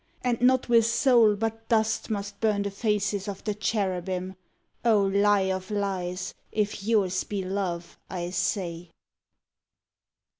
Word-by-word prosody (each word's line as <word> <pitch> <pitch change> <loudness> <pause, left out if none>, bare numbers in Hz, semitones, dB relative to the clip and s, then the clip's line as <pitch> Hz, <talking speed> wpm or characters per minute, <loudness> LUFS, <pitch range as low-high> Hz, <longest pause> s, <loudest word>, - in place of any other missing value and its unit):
and 245 -2 0
not 255 +1 +4
with 230 -1 +5
soul 230 -2 +4
but 225 +1 -4
dust 220 0 +1
Must 200 -1 -4
burn 210 -2 +2
the 200 - -3
faces 205 -1 -1
of 200 -1 -6
the 210 - -1
Cherubim, 190 -3 -2 0.5
O 220 -4 +4
lie 200 0 +3
of 185 0 -5
lies, 190 -3 -2 0.2
if 210 -1 -1
yours 200 -4 +1
be 200 -2 -3
love, 185 -3 -3
I 175 -1 -4
say! 175 -2 -2
200 Hz, 135 wpm, -27 LUFS, 190-220 Hz, 0.5 s, with